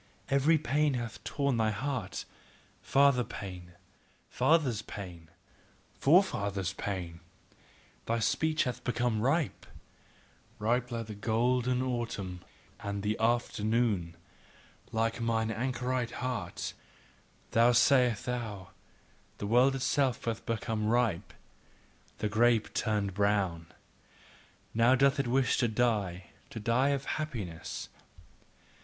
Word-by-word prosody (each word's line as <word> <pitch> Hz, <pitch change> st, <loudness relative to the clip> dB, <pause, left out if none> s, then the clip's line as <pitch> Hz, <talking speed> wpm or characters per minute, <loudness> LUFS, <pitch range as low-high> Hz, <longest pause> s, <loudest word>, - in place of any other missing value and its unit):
Every 140 Hz, +4 st, +4 dB
pain 150 Hz, -1 st, +1 dB
hath 120 Hz, -2 st, -5 dB
torn 135 Hz, +3 st, 0 dB
thy 110 Hz, -1 st, +2 dB
heart, 110 Hz, -2 st, -3 dB, 0.6 s
father 140 Hz, -2 st, +4 dB
pain, 90 Hz, -5 st, -8 dB, 0.6 s
fathers' 145 Hz, -9 st, +2 dB
pain, 90 Hz, -6 st, -9 dB, 0.7 s
forefathers' 100 Hz, -, +2 dB
pain; 90 Hz, -4 st, -4 dB, 0.9 s
thy 115 Hz, -, +1 dB
speech 155 Hz, +8 st, +1 dB
hath 125 Hz, -3 st, -4 dB
become 120 Hz, -3 st, 0 dB
ripe, 140 Hz, +4 st, 0 dB, 0.9 s
Ripe 120 Hz, +3 st, 0 dB
like 115 Hz, -2 st, -3 dB
the 110 Hz, -, -7 dB
golden 125 Hz, +4 st, +1 dB
autumn 115 Hz, -8 st, -3 dB, 0.4 s
and 100 Hz, 0 st, -4 dB
the 105 Hz, +1 st, 0 dB
afternoon, 110 Hz, -6 st, +1 dB, 0.7 s
like 115 Hz, +1 st, 0 dB
mine 110 Hz, -1 st, 0 dB
anchorite 125 Hz, +1 st, -2 dB
heart 125 Hz, -1 st, -3 dB, 0.8 s
now 115 Hz, +2 st, +5 dB
sayest 125 Hz, -2 st, +4 dB
thou: 110 Hz, -6 st, -4 dB, 0.7 s
The -, -, -4 dB
world 125 Hz, +5 st, +4 dB
itself 135 Hz, -1 st, 0 dB
hath 115 Hz, -1 st, -2 dB
become 110 Hz, -1 st, -1 dB
ripe, 115 Hz, -6 st, +1 dB, 0.9 s
the 105 Hz, -, -1 dB
grape 115 Hz, +1 st, +2 dB
turneth 105 Hz, -4 st, 0 dB
brown, 95 Hz, -5 st, 0 dB, 1.1 s
Now 115 Hz, +3 st, +5 dB
doth 140 Hz, +2 st, +3 dB
it 135 Hz, -, 0 dB
wish 130 Hz, +1 st, +2 dB
to 120 Hz, -, +2 dB
die, 105 Hz, -6 st, 0 dB, 0.2 s
to -, -, -7 dB
die 115 Hz, +6 st, +2 dB
of 140 Hz, -1 st, -1 dB
happiness. 110 Hz, -, -4 dB
115 Hz, 110 wpm, -30 LUFS, 105-125 Hz, 1.1 s, now